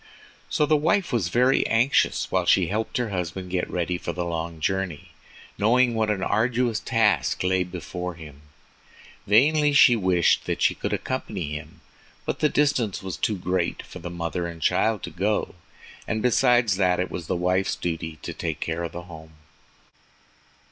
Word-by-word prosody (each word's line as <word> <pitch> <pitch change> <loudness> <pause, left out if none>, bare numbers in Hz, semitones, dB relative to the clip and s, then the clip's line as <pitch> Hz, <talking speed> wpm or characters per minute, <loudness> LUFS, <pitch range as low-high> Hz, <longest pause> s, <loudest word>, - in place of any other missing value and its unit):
So 150 - +2
the 155 - +3
wife 170 +3 +1
was 110 -8 +1
very 125 +6 +3
anxious 115 +5 +2
while - - +1
she - - +5
helped 110 +3 -2
her 120 -3 -1
husband 90 0 -4
get 90 -1 -1
ready 90 0 -2
for - - -4
the 90 -1 -3
long 85 -1 -4
journey, 95 -2 -2 0.5
knowing 120 +3 +3
what 110 -1 0
an 100 -3 -1
arduous 120 0 +1
task 110 -7 +1
lay 95 0 +2
before 90 0 -6
him. 75 -4 -12 0.9
Vainly 145 +8 +4
she 130 -4 +7
wished 90 -5 +2
that - - -2
she - - +3
could - - -4
accompany 100 - -3
him, 75 -1 -8 0.4
but - - -3
the 150 - +3
distance 125 -9 0
was 95 -2 -4
too 105 - -1
great 90 -1 -2
for - - -11
the - - -6
mother 85 0 -3
and 85 -1 -8
child 110 -2 +1
to - - -5
go, 100 +5 -1 0.5
and 110 -1 -2
besides 120 -4 +3
that, 90 -2 +2
it 90 - -2
was 85 -3 -6
the - - -1
wife's 90 +2 0
duty 80 -2 -4
to - - -5
take 80 -3 -4
care 80 +1 -3
of 85 - -5
the 85 - -6
home. 80 -2 -12
95 Hz, 175 wpm, -24 LUFS, 85-115 Hz, 0.9 s, she